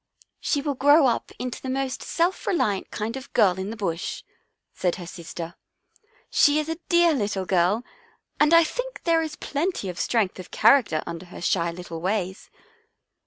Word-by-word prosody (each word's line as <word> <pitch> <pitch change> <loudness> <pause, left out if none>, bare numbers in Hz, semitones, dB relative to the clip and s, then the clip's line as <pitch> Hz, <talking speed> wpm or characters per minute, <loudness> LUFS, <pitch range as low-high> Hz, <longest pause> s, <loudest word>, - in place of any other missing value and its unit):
" - - -56
She 285 - 0
will 290 -1 0
grow 290 +3 +5
up 240 -3 0
into 250 -1 -5
the 260 - -5
most 265 0 -2
self 345 +3 -1
reliant 210 - 0
kind 215 +3 -4
of 265 0 -7
a - - -42
girl 190 -3 +4
in 190 +2 -3
the 225 - -5
Bush," 170 -5 -3 0.5
said 180 -2 0
her 180 - -8
sister. 170 -1 -7 0.4
" - - -33 0.3
She 290 0 +5
is 305 0 0
a 325 +1 -3
dear 345 -1 +5
little 205 -7 -1
girl 185 +5 +2 0.6
and 300 +1 +4
I 335 0 +8
think - - -5
there 330 -1 +3
is 315 -2 -4
plenty 300 - -2
of 180 - -6
strength 215 -6 0
of 180 - -9
character 220 - +4
under 170 +1 -7
her 175 - -10
shy 170 -1 +1
little 170 -1 -8
ways." 190 0 -2
220 Hz, 190 wpm, -25 LUFS, 180-300 Hz, 0.6 s, I